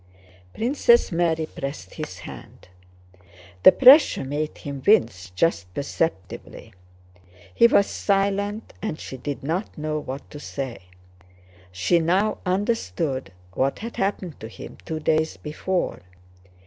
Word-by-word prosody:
Princess 240 -1 +3
Mary 165 -2 +1
pressed 140 -10 -7
his - - -6
hand. - - -12 0.9
The - - +10
pressure 270 - +7
made 145 +3 -3
him 140 -2 -7
wince 110 - +3
just 90 - 0
perceptibly. 140 - -4 0.8
He 235 - +6
was 200 -3 +4
silent, 200 +2 -1
and 185 -8 -3
she - - -7
did 140 +2 -5
not 170 +8 -3
know 155 0 -2
what 135 -1 -7
to 145 - -8
say. 130 -9 -6 0.9
She 90 - +2
now 190 +6 +1
understood 165 - -1 0.2
what 135 +6 0
had 230 +2 -7
happened 195 -5 -2
to 110 - -7
him 110 - -11
two 160 -1 -3
days 155 0 +1
before. 175 +4 -2
160 Hz, 120 wpm, -24 LUFS, 135-200 Hz, 0.9 s, The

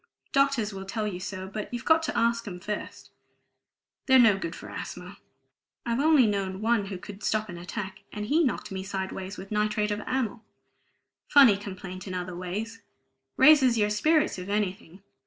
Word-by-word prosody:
Doctors 275 -7 +2
will 195 0 -6
tell 210 +3 -3
you 190 -4 -3
so, 185 0 -6
but 210 +2 -6
you've 240 -1 -5
got 320 0 +5
to 320 - -3
ask 230 -1 +1
'em 180 -3 -6
first; 210 +3 -6 1.0
they're 260 -1 +7
no 225 -5 +6
good 170 -3 -5
for - - -10
asthma! 180 +3 -8 0.7
I've 235 +1 0
only 300 -3 +5
known 195 -2 -1
one 220 -2 +1
who 195 -1 -5
could 200 +2 -10
stop 215 +1 -1
an 175 -1 -7
attack, 190 +2 -6
and 210 0 -5
he 310 +9 +3
knocked 260 - -2
me 190 -1 -4
sideways 190 0 -5
with 195 +2 -9
nitrite 210 0 0
of 205 +1 -2
amyl. 245 -4 -2 0.9
Funny 270 -8 +7
complaint 190 -1 -8
in 185 - -4
other 180 0 -4
ways; 210 +6 -5 0.6
raises 265 -4 +6
your 210 -1 +2
spirits, 305 - +2
if 180 +2 -7
anything. 195 -2 -3
210 Hz, 175 wpm, -27 LUFS, 190-235 Hz, 1.0 s, they're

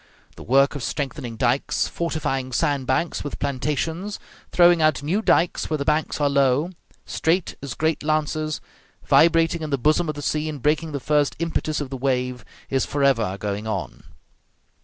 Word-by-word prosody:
The - - -12
work 135 +3 +3
of 145 - -5
strengthening 130 -3 -4
dikes, 125 +4 +1
fortifying 135 -6 -2
sand 140 -2 0
banks 160 +6 0
with 145 - -5
plantations, 150 +8 -2 0.3
throwing 175 -1 +5
out 155 -3 +2
new 180 +9 0
dikes 175 -5 +2
where 155 - 0
the 140 - -3
banks 155 +1 0
are 145 - +3
low, 140 +4 +2 0.3
straight 165 +2 0
as 140 -3 -5
great 160 +3 0
lances, 155 0 -1 0.4
vibrating 165 0 +4
in 155 - -4
the 140 - +1
bosom 155 +5 +2
of 155 - -2
the 145 - -6
sea 155 +2 -1
and 150 -2 -5
breaking 155 +2 +1
the 140 - -3
first 145 +1 +1
impetus 160 -2 -1
of 140 -2 -5
the 135 - -4
wave, 125 -1 -1 0.2
is 135 -1 +1
forever 130 -9 +1
going 105 +1 -4
on. 95 -4 -4
145 Hz, 170 wpm, -23 LUFS, 135-160 Hz, 0.4 s, throwing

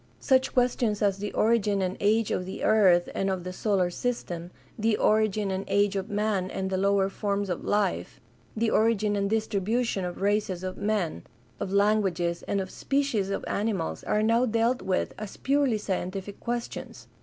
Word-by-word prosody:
Such 260 -1 +2
questions 240 -4 +1
as 200 -1 +1
the 205 +1 -3
origin 215 -3 +2
and 185 +1 -1
age 215 +1 +2
of 180 - -1
the 190 - -6
earth 185 -5 +5
and 195 - 0
of 190 -2 -2
the 185 0 -5
solar 190 -3 +1
system; 175 -7 -3 0.3
the 220 -1 +1
origin 215 -2 +2
and 190 +1 -2
age 200 0 +2
of 195 +2 -3
man 205 -3 0
and 190 0 -3
the 190 - 0
lower 195 0 +2
forms 200 0 -2
of 175 - -3
life; 130 - -1 0.4
the 225 0 +1
origin 215 -2 +2
and 200 0 0
distribution 220 0 0
of 175 -1 -5
races 200 -3 0
of 185 0 -4
men, 200 - -1 0.4
of 190 - -3
languages, 195 -4 +1
and 200 - 0
of 190 -1 -4
species 275 -8 0
of 200 - -3
animals 200 - -2
are 210 - +1
now 230 +3 +3
dealt 230 +2 +1
with 185 -1 -1
as 210 -2 -7
purely 275 -4 +2
sci 205 -2 -2
entific 190 +2 -5
questions. 240 0 -5
205 Hz, 180 wpm, -27 LUFS, 190-220 Hz, 0.4 s, earth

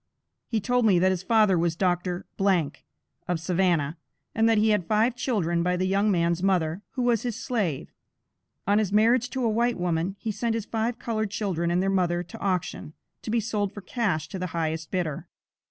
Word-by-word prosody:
He 225 - 0
told 245 +2 +2
me 190 -4 +5
that 185 +2 +3
his 185 -2 -1
father 210 -3 +3
was 165 -1 +1
Dr. 180 0 -1 1.0
of 175 -2 0
Savannah, 170 -3 +1 0.4
and 225 0 +3
that 225 - +4
he 215 +1 +3
had 210 -6 +1
five 225 +3 +2
children 175 -10 0
by 180 +1 +1
the 185 - 0
young 200 +3 +2
man's 170 -2 +1
mother, 180 -2 +1
who 255 - -1
was 240 -3 +2
his 240 -4 -3
slave. 205 - -2 0.7
On 205 +2 +3
his 205 -3 0
marriage 230 +4 +3
to 255 +1 -3
a - - +3
white 235 +2 +1
woman, 175 +1 -1
he 220 - -3
sent 225 +2 -1
his 225 -2 -3
five 230 +1 -2
colored 220 -2 -2
children 190 -5 -1
and 175 +2 +1
their 195 - +1
mother 175 -2 +1
to 220 +6 -11
auction, 180 -5 -2 0.3
to - - -7
be 230 +2 +2
sold 210 -2 -2
for 205 - -7
cash 180 -6 -1
to 190 - -5
the 185 - -2
highest 160 0 -2
bidder. 170 -6 -3
195 Hz, 200 wpm, -26 LUFS, 175-225 Hz, 1.0 s, me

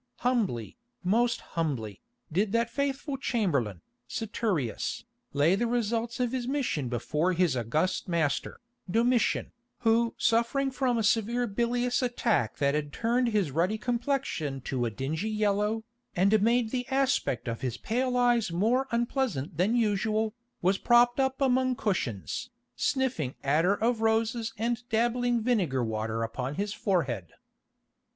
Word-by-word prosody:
Humbly, 220 - 0 0.3
most 235 +6 +2
humbly, 135 - -2 0.3
did 195 +5 +1
that 230 0 +1
faithful 280 +1 -2
chamberlain, 145 - -1 0.2
Saturius, 200 - -2 0.3
lay 145 +5 +3
the 235 +5 +1
results 230 0 -1
of 245 -2 +1
his 255 -2 -2
mission 255 - -1
before 150 +9 0
his 175 -5 +2
august 140 - 0
master, 165 -5 -1 0.3
Domitian, 235 +4 +2 0.3
who 230 0 +2
suffering 235 +4 +2
from 255 -2 0
a 225 - +1
severe 230 +3 +2
bilious 240 +3 0
attack 240 - 0
that 140 -1 +2
had 150 -1 -2
turned 240 - +1
his 205 -9 +1
ruddy 175 +9 +1
complexion 235 - -1
to 125 -1 -2
a - - 0
dingy 150 - -3
yellow, 210 +1 0 0.3
and 200 +3 +4
made 230 +1 +2
the 250 -1 -2
aspect 265 - 0
of 115 -1 -3
his 125 -2 -2
pale 250 - -1
eyes 240 -5 +3
more 230 +10 +2
unpleasant 235 - -1
than 195 +7 +2
usual, 215 -1 +1 0.3
was 190 +2 +3
propped 240 +1 +4
up 265 0 +1
among 260 -1 +2
cushions, 185 - -2 0.3
sniffing 255 - 0
attar 160 +8 +3
of 230 +1 0
roses 225 +1 +1
and 230 +1 -1
dabbing 240 +1 +1
vinegar 180 - +1
water 110 0 -2
upon 125 +5 -3
his 205 +3 -2
forehead. 130 - -1
220 Hz, 135 wpm, -28 LUFS, 155-240 Hz, 0.3 s, and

